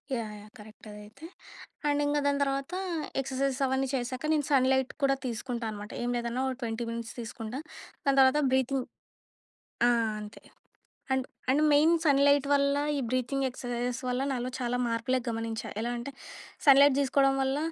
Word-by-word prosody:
Yeah! 220 -3 -4
Yeah! 210 +1 -15
Correct 215 +1 -14
అదైతే. 210 +8 -12 0.6
And 290 0 +2
ఇంక 290 0 +1
దాని 285 0 +2
తర్వాత 275 +4 -2 0.5
ఎక్ససైజెస్ 270 0 -2
అవన్నీ 265 0 0
చేశాక 255 +2 -3
నేను 295 -2 +1
సన్‌ 260 -2 +4
లైట్ 265 -1 +1
కూడా 275 0 +4
తీసుకుంటా 235 0 -4
అనమాట. 205 0 -8
ఏం 240 - -1
లేదన్నా 235 +2 -2
ఒక 260 - -3
20 225 0 -3
మినిట్స్ 230 -1 -6
తీసుకుంటా. 230 +2 -6 0.5
దాని 275 -1 +3
తర్వాత 265 +3 +5
బ్రీతింగ్ 260 0 +1 1.0
ఆ! - - +5 0.3
అంతే. 210 0 -11 0.7
And, 265 -1 0 0.2
and 285 +3 +3
main 295 +3 +5
sun 285 -4 +4
light 285 0 +4
వల్ల, 280 0 +3 0.2
ఈ - - 0
బ్రీతింగ్ 255 +2 -1
ఎక్ససైజెస్ 245 0 -3
వల్ల 250 +1 0
నాలో 250 -1 -2
చాలా 245 -1 -1
మార్పులే 235 +3 0
గమనించా. 225 -1 -3
ఎలా 235 +2 -2
అంటే 240 +4 -6 0.5
సన్‌ 275 -2 +8
లైట్ 285 -1 +6
తీసుకోవడం 275 0 +3
వల్ల, 265 +1 0
260 Hz, 165 wpm, -29 LUFS, 235-275 Hz, 1.0 s, సన్‌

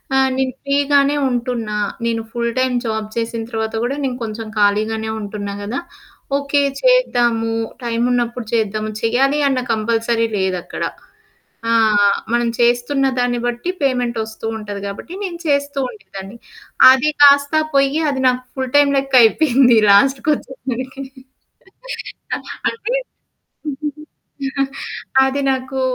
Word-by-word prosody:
ఆ! - - +4 0.2
నేను 260 -1 0
ఫ్రీ 280 0 +1 0.2
గానే 285 +1 +4
ఉంటున్నా. 240 -4 -2 0.3
నేను 230 -1 0
ఫుల్ 235 0 -1
టైమ్ 255 -1 +1
జాబ్ 220 -1 -2
చేసిన 230 0 -2
తర్వాత 220 -1 -2
కూడా 255 +3 -1
నేను 250 -2 -2
కొంచెం 220 0 -5
ఖాళీగానే 215 +2 +1
ఉంటున్నా 205 -1 -5
కదా! 235 +7 -3 0.6
ఓకే, 280 0 +1 0.2
చేద్దాము 240 - +2 0.3
టైమున్నప్పుడు 240 0 0
చేద్దాము. 215 -1 0
చేయాలి 270 +6 +2
అన్న 265 -2 +1
కంపల్సరీ 230 +1 0
లేదక్కడ. 190 -2 -2 0.9
ఆ! - - +2 0.6
మనం 240 0 +2
చేస్తున్నదాన్ని 245 0 +1
బట్టి 240 +8 -3
పేమెంట్ 245 -3 0
వస్తూ 220 0 -9
ఉంటది 205 -1 -6
కాబట్టి. 200 - -8
నేను 345 -3 -5
చేస్తూ 285 0 0
ఉండేదాన్ని. 195 0 -10 0.5
అది 265 +3 +3
కాస్తా 285 +2 +6 0.2
పోయి 275 +3 +3
అది 265 -1 -2
నాకు 250 0 -2
ఫుల్ 260 -1 -4
టైమ్ 290 -1 +5
లెక్క 270 -1 0
అయిపోయింది 245 -1 +4
లాస్ట్ 260 +6 +4
కోచ్చేసారికి. 265 -2 -3 1.7
అంటే 460 +2 -4 2.3
అది 265 +1 0
నాకు 265 0 -3
245 Hz, 115 wpm, -19 LUFS, 225-275 Hz, 2.3 s, కాస్తా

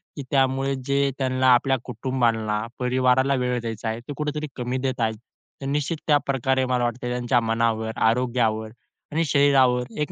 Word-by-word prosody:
की 140 - -6
त्यामुळे 135 0 +1
जे 140 0 +2
त्यांना 130 -1 +1
आपल्या 135 +2 +2
कुटुंबांना, 115 -4 -1
परिवाराला 130 +1 +2
वेळ 125 -1 0
द्यायचा 115 -1 -5
आहे, 110 +1 -3
ते 125 +5 -8
कुठेतरी 150 0 -3
कमी 125 0 -3
देत 130 0 -2
आहेत. 110 -1 +1 0.5
तर - - -5
निश्चित 150 +3 -1
त्याप्रकारे 135 -3 +1
मला 125 -1 0
वाटतंय 120 +1 -2
त्यांच्या 125 0 +1
मनावर, 115 -1 0
आरोग्यावर 115 -2 +1 0.4
आणि 160 +2 +1
शरीरावर 135 -4 +4 0.2
एक 150 - -2
130 Hz, 155 wpm, -24 LUFS, 120-135 Hz, 0.5 s, शरीरावर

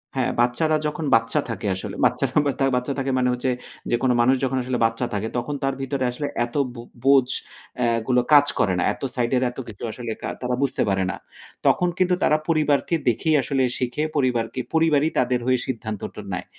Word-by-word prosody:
হ্যাঁ, 130 -2 +1
বাচ্চারা 155 +6 +2
যখন 150 +1 -4
বাচ্চা 115 0 +2
থাকে 115 -2 -4
আসলে। 95 - -6
বাচ্চারা - - +1
বাচ্চা 135 -1 0
বাচ্চা 125 +2 -1
থাকে 135 0 -1
মানে 125 - +2
হচ্ছে, 125 +1 -1 0.4
যেকোনো 125 +1 +2
মানুষ 130 +3 +4
যখন 130 0 0
আসলে 125 0 -1
বাচ্চা 115 +2 0
থাকে, 105 +1 -1
তখন 145 +4 -2
তার 135 0 +1
ভিতরে 135 0 -2
আসলে 145 +4 -4 0.2
এত 120 - -13 0.2
বু 120 - -8 0.2
বোঝ 135 -2 +5 0.5
অ্যা 120 - +2 0.2
গুলো 125 -1 +3
কাজ 145 -1 +8
করে 95 - +2
না। - - +1
এত - - -15
সাইড 120 -1 0
এর 125 - +1
এত - - -19
কিছু 110 0 -10
আসলে 115 0 -6
কা - - -3
তারা 125 0 -1
বুঝতে 140 - 0
পারে 95 -1 +1
না। - - -6 0.5
তখন 180 - +3
কিন্তু 180 -1 +3
তারা 155 - +4
পরিবারকে 155 0 +2
দেখেই 155 +7 +2
আসলে 135 0 0
শিখে, 125 +4 -2
পরিবারকে, 125 -4 0
পরিবারই 160 -2 +3
তাদের 125 0 +2
হয়ে 130 -1 +3
সিদ্ধান্তটা 110 -5 -5
নেয়। - - -4
130 Hz, 195 wpm, -23 LUFS, 120-140 Hz, 0.5 s, কাজ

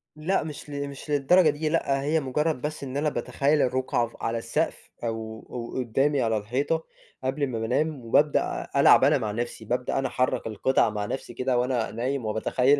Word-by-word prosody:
لأ 160 +6 0
مش 150 -1 -8
ل 140 0 -3
مش 140 +2 -10
للدرجة 150 +5 +5
دي، 155 +1 -1
لأ 140 -4 +1
هي 150 +3 +1
مجرد 150 +1 -1
بس 150 +1 -4
إن 135 0 -4
أنا 150 +1 +1
باتخيل 140 +3 +1
الرقعة 130 -2 +1
ف 115 - -16
على 115 0 0
السقف 115 +8 -2
أو 110 -1 -4
أو 120 0 -6
قدّامي 135 +4 +1
على 115 -2 +1
الحيطة 135 +10 -1 0.4
قبل 135 +3 -1
امّا 125 -5 -1
بانام، 130 +4 -1
وبابدأ 145 +6 +2
ألعب - - +7
أنا - - +5
مع 105 - -2
نَفْسي، 120 +3 -4
بابدأ 125 +2 -1
أنا 135 - 0
أحرّك 125 -1 0
القطع 115 +2 +2
مع 105 -1 -3
نَفْسي 120 +2 -5
كده 130 +1 0
وأنا 120 -2 0
نايم، 125 +3 -2
وباتخيل 125 +6 +2
130 Hz, 190 wpm, -26 LUFS, 115-145 Hz, 0.4 s, ألعب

